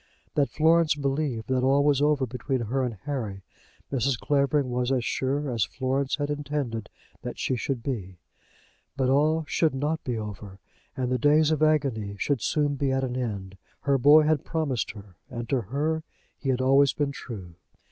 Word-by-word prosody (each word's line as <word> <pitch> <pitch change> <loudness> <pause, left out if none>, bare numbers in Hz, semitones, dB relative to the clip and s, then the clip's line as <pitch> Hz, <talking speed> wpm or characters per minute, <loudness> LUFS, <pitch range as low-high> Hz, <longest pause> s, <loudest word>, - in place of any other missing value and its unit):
That 140 -2 +2
Florence 160 0 +3
believed 140 -4 -2
that 130 -1 +2
all 135 +2 +4
was 145 -1 +3
over 145 -2 +3
between 125 +2 -2
her 125 +4 -1
and 120 -3 -2
Harry, 110 -10 -4 0.5
Mrs. 135 -1 +1
Clavering 140 -2 +1
was 125 +1 0
as 125 -3 +1
sure 140 +3 -1
as 115 -3 +1
Florence 135 +1 -1
had 145 0 -2
intended 145 -7 -3 0.3
that - - -6
she 130 - 0
should 125 0 -3
be. 100 -10 -4 0.8
But 130 -2 +2
all 155 +4 +3
should 155 -2 +1
not 150 +4 -1
be 125 -3 -2
over, 105 -2 -7 0.4
and 125 -1 -1
the 125 - +1
days 150 +4 +4
of 155 -1 0
agony 135 -10 +1
should 140 +2 0
soon 145 +3 +1
be 135 0 0
at 135 0 0
an 125 -1 -2
end. 100 -6 -4 0.2
Her 140 -2 +2
boy 150 +4 +7
had 155 -2 +2
promised 150 -8 -1
her, 100 -5 -13
and 120 -3 -5
to 135 -3 +1
her 145 +9 -1 0.3
he 135 - -4
had 130 -1 +1
always 135 +1 +5
been 145 -1 -1
true. 100 -11 -8
135 Hz, 180 wpm, -26 LUFS, 120-145 Hz, 0.8 s, boy